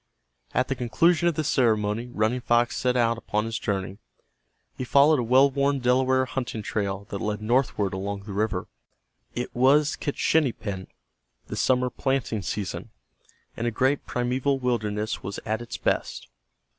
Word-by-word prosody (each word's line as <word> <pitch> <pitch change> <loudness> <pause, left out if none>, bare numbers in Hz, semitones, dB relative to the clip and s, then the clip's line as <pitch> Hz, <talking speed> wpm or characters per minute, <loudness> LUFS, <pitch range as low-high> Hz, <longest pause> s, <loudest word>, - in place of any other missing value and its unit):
At 130 - +2
the 135 - 0
conclusion 165 +8 +2
of 170 - +1
the 155 - -1
ceremony 115 -4 +1
Running 110 +3 0
Fox 120 0 +2
set 125 -1 +1
out 115 -1 +2
upon 105 -1 -1
his 115 0 -3
journey. 95 -1 -3 0.8
He - - -4
followed 140 +3 +5
a - - 0
well 130 +4 +5
worn 140 +1 +1
Delaware 130 +1 +2
hunting 125 -4 -4
trail 100 -1 -2
that 100 - -3
led 105 0 -2
northward 110 -3 +1
along 100 +1 -4
the 100 -1 -7
river. 100 -2 -1 0.7
It 120 - -4
was 140 +4 +4
Kitschinipen, 115 -10 -1 0.6
the - - -4
summer 125 -1 +2
planting 135 -5 -1
season, 95 0 -4 0.7
and 115 - -2
a - - +3
great 130 +5 0
primeval 130 +3 0
wilderness 110 -4 -2
was 100 +1 -5
at 110 +2 -1
its 120 - -6
best. - - -2
120 Hz, 155 wpm, -25 LUFS, 105-130 Hz, 0.8 s, followed